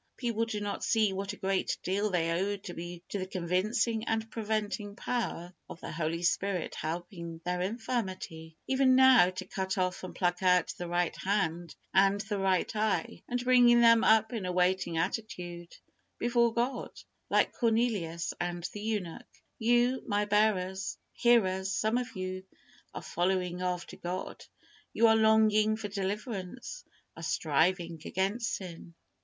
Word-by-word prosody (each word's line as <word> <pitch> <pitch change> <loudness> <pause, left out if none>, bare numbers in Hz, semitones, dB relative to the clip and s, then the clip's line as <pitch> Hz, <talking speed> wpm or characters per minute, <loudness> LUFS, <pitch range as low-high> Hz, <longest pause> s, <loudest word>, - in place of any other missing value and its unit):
People 230 -2 -1
do 220 -2 -3
not 205 -1 -4
see 215 -3 +2
what 195 +1 -3
a - - -9
great 190 0 -1
deal 200 +3 0
they 165 -3 0
owe 195 +4 0
to 190 -2 -8
the 175 0 -7 0.3
convincing 195 +6 0
and 225 0 -1
preventing 210 -2 -3
power 210 -8 -3 0.2
of - - -9
the - - -7
Holy 165 +2 -2
Spirit 185 0 0
helping 170 0 -5
their 180 0 -1
infirmity, 190 -7 -4
even 265 -1 +3
now, 260 -7 +7
to 185 0 -6
cut 190 0 -3
off 185 0 -1
and 185 - -7
pluck 175 0 0
out 180 -2 +3
the 175 - -4
right 175 0 0
hand 175 -4 -1 0.2
and 195 +1 +4
the 210 -1 -3
right 190 +2 +1
eye, 220 +2 -1
and 245 0 -1
bringing 245 -1 +6
them 230 -1 +6
up 220 +1 +4
in 210 -6 -3
a - - -1
waiting 180 -1 +1
attitude 175 -2 -4 0.4
before 235 0 +2
God, 240 +2 -1 0.4
like - - +2
Cornelius 220 -8 0
and 175 0 -3
the 205 - -6
eunuch. 210 -6 -4 0.3
You, 240 +3 +3
my 205 -1 0 0.9
hearers, 190 -6 +3
some 220 +4 +1
of 250 -1 -6
you, 185 0 -4 0.5
are - - -6
following 180 0 -1
after 180 -1 -3
God. 180 +1 -5 0.5
You 230 - +4
are 225 0 +6
longing 220 -1 +4
for 210 -2 -5
deliverance, 205 - -5 0.3
are 165 - -10
striving 165 +1 0
against 200 +5 -1
sin. 170 -2 -9
195 Hz, 150 wpm, -30 LUFS, 180-225 Hz, 0.9 s, now